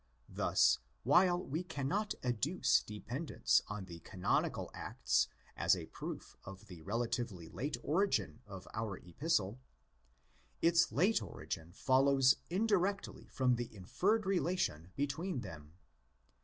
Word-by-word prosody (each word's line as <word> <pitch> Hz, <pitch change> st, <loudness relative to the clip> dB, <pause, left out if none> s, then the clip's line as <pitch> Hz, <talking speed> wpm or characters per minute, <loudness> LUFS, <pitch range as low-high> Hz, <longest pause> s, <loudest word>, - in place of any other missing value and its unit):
Thus, -, -, +3 dB, 0.2 s
while 175 Hz, -, +5 dB
we 155 Hz, +5 st, -2 dB
cannot 180 Hz, +7 st, -2 dB
adduce 130 Hz, +8 st, +2 dB
dependence 120 Hz, +9 st, 0 dB
on 105 Hz, -2 st, -5 dB
the 85 Hz, -2 st, -9 dB
Canonical 90 Hz, +2 st, -1 dB
Acts 65 Hz, 0 st, 0 dB, 0.3 s
as -, -, +4 dB
a -, -, -6 dB
proof -, -, -7 dB
of 95 Hz, 0 st, -10 dB
the 90 Hz, -4 st, -11 dB
relatively 115 Hz, -3 st, -2 dB
late 140 Hz, -, -3 dB
origin 175 Hz, -, +1 dB
of 95 Hz, -2 st, -9 dB
our 110 Hz, -4 st, -3 dB
Epistle, 105 Hz, -, -1 dB, 1.0 s
its 170 Hz, +1 st, +4 dB
late 195 Hz, +9 st, +3 dB
origin 80 Hz, +1 st, -6 dB
follows 135 Hz, +3 st, +4 dB
indirectly 200 Hz, +1 st, 0 dB
from 125 Hz, -2 st, +1 dB
the 120 Hz, -1 st, -4 dB
inferred 200 Hz, -, +1 dB
relation 175 Hz, -, 0 dB
between 145 Hz, +2 st, -2 dB
them. 75 Hz, -5 st, -10 dB
130 Hz, 115 wpm, -35 LUFS, -, 1.0 s, while